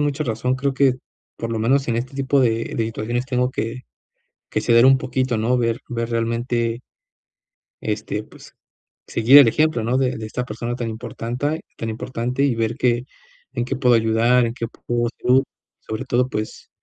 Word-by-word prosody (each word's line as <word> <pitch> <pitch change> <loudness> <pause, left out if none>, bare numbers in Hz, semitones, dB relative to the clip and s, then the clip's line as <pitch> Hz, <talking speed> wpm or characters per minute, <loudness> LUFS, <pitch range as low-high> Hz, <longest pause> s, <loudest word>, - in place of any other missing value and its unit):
mucha 145 +1 0
razón, 125 +2 -1
creo 135 +1 -1
que 135 -2 +3 0.4
por 115 - -4
lo 110 - -1
menos 135 +4 +2
en 115 -1 0
este 125 +3 -4
tipo 135 0 +2
de 115 -2 0
de 115 - +1
situaciones 115 +3 -3
tengo 125 -1 0
que 115 +1 -4 0.7
que - - 0
ceder 115 +2 +5
un 135 0 +6
poquito, 130 -2 -1
¿no?, 120 +3 +1
ver 115 -1 0
ver 115 -1 -3
realmente 115 +1 -1 1.0
este, 105 0 -3
pues, - - -16 0.5
seguir 120 +5 +6
el 140 -5 +9
ejemplo, 155 -2 +2
¿no?, 125 +3 +1
de 130 -3 0
de 110 - -6
esta 125 +3 -3
persona 120 +1 -4
tan 120 -2 -3
importante 125 +7 -3 0.2
tan 115 - -4
importante, 125 +3 -2
y 135 -5 +2
ver, 115 0 -1
qué 125 -1 +1 0.5
en - - -1
qué 135 - -2
puedo 125 -3 +4
ayudar, 115 +2 +3
en 115 - -3
qué 115 - -4
apoyo, 120 +3 0 0.4
sobre 110 +4 -5
todo, 125 0 +1
pues, 110 -2 -5
120 Hz, 180 wpm, -21 LUFS, 115-130 Hz, 1.0 s, el